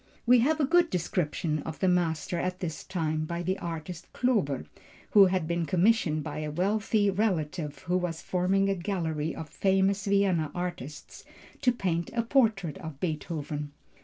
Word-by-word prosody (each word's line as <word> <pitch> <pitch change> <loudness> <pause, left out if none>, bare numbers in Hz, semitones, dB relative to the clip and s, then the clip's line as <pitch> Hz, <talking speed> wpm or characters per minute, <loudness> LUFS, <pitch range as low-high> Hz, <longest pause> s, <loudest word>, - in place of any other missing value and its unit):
We 245 +1 +6
have 305 +6 +2
a 290 - +3
good 345 +3 +4
description 165 -3 -1
of 155 +2 -6
the 190 - +1
master 175 -1 +1
at 185 +1 -2
this 165 -4 -4
time 155 -4 -2
by 170 +2 -3
the 185 +2 -1
artist 170 +1 -6
Klober, 195 - 0 0.5
who 200 -2 +8
had 185 -3 0
been 170 -1 -1
commissioned 180 -4 +2
by - - -5
a 155 0 -3
wealthy 205 +5 +1
relative 170 -7 -1
who 180 0 +1
was 175 -3 -2
forming 190 +2 +1
a 195 - +2
gallery 165 -5 -2
of 160 - -6
famous 195 +3 +1
Vienna 195 -6 +2
artists, 175 -5 -6 0.4
to 255 -3 +4
paint 175 -7 -1
a 230 - +1
portrait 220 - +1
of 160 -6 -8
Beethoven. 150 -3 -4
180 Hz, 160 wpm, -28 LUFS, 160-195 Hz, 0.5 s, who